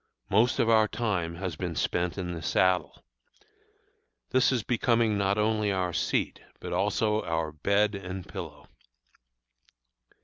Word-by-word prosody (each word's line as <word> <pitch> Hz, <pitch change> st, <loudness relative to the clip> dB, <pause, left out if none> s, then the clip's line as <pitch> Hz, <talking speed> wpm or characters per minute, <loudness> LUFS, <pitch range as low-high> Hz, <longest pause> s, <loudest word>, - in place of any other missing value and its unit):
Most 115 Hz, +5 st, +3 dB
of -, -, +2 dB
our 110 Hz, -1 st, +5 dB
time 95 Hz, -8 st, -2 dB
has 90 Hz, -2 st, -4 dB
been 85 Hz, -1 st, -4 dB
spent 90 Hz, +3 st, -1 dB
in 90 Hz, -2 st, -3 dB
the 80 Hz, -, -6 dB
saddle. 95 Hz, +2 st, +1 dB, 1.3 s
This 130 Hz, +1 st, +4 dB
is 125 Hz, -5 st, 0 dB
becoming 115 Hz, -2 st, +2 dB
not 100 Hz, 0 st, +1 dB
only 105 Hz, -1 st, +1 dB
our 90 Hz, -2 st, -1 dB
seat, -, -, -1 dB, 0.2 s
but -, -, -6 dB
also 110 Hz, -1 st, +1 dB
our 80 Hz, -2 st, -2 dB
bed 100 Hz, +7 st, +1 dB
and 95 Hz, -2 st, -6 dB
pillow. -, -, -8 dB
100 Hz, 135 wpm, -28 LUFS, 90-110 Hz, 1.3 s, our